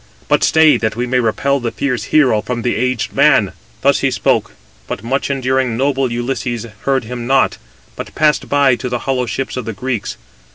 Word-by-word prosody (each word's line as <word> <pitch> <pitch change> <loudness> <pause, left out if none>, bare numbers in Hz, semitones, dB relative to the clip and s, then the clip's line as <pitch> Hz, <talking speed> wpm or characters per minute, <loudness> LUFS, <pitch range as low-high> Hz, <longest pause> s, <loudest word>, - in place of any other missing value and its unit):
But - - +2
stay, 160 -1 +5
that 110 -1 -2
we 120 +2 -1
may 125 +1 +1
repel 135 +4 0
the 120 -2 -2
fierce 125 0 -2
hero 130 -8 +3
from 120 +1 -4
the 120 - 0
aged 125 -1 -1
man." - - +4 0.3
Thus - - +3
he - - +1
spoke: - - 0 0.3
but 100 - -5
much 135 +5 -1
enduring, 130 -3 0
noble 135 -1 0
Ulysses 120 -1 -3 0.2
heard 135 -2 +2
him 120 +1 -6
not, 135 0 +2 0.4
but - - -8
passed 150 -1 +1
by 140 -3 +3
to 125 +2 -4
the 120 -1 -4
hollow 130 -2 0
ships 135 +2 -4
of 125 - -4
the 115 - -4
Greeks. 120 +1 -4
125 Hz, 195 wpm, -17 LUFS, 120-135 Hz, 0.4 s, stay